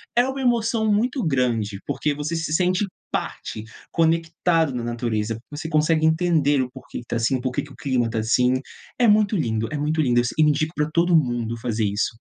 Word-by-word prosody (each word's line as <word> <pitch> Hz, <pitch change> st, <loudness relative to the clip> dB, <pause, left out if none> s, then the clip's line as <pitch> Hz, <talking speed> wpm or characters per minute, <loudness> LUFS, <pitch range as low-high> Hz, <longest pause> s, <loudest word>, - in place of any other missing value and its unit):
É 245 Hz, +2 st, +4 dB
uma 270 Hz, 0 st, -4 dB
emoção 230 Hz, -3 st, +1 dB
muito 240 Hz, +3 st, +1 dB
grande 125 Hz, -6 st, +1 dB, 0.2 s
porque 150 Hz, -, -1 dB
você 150 Hz, +3 st, -3 dB
se 160 Hz, -2 st, -2 dB
sente 185 Hz, +3 st, +2 dB, 0.3 s
parte, 110 Hz, -, -4 dB, 0.3 s
conectado 165 Hz, -1 st, +1 dB
com 125 Hz, -, -2 dB
a 115 Hz, -, -4 dB
natureza. 115 Hz, -2 st, -2 dB
Você 160 Hz, +2 st, -5 dB
consegue 155 Hz, 0 st, +2 dB
entender 160 Hz, -4 st, +3 dB
o 125 Hz, -, -6 dB
porque 130 Hz, -2 st, -9 dB
está 120 Hz, 0 st, -5 dB
assim, 120 Hz, +3 st, +1 dB
porque 130 Hz, 0 st, -2 dB
o 140 Hz, -2 st, -12 dB
clima 130 Hz, -4 st, 0 dB
está 115 Hz, 0 st, -4 dB
assim. 125 Hz, +3 st, +2 dB, 0.4 s
É 240 Hz, -, +5 dB
muito 210 Hz, 0 st, +4 dB
lindo, 115 Hz, -6 st, -1 dB
é 150 Hz, -, -2 dB
muito 155 Hz, +2 st, 0 dB
lindo. 120 Hz, -4 st, +3 dB, 0.2 s
Indico 155 Hz, +1 st, +2 dB
para 150 Hz, +1 st, 0 dB
todo 170 Hz, +2 st, +3 dB
mundo 120 Hz, -5 st, +1 dB
fazer 115 Hz, -2 st, -1 dB
isso. 105 Hz, +2 st, -1 dB
150 Hz, 185 wpm, -23 LUFS, 120-165 Hz, 0.4 s, É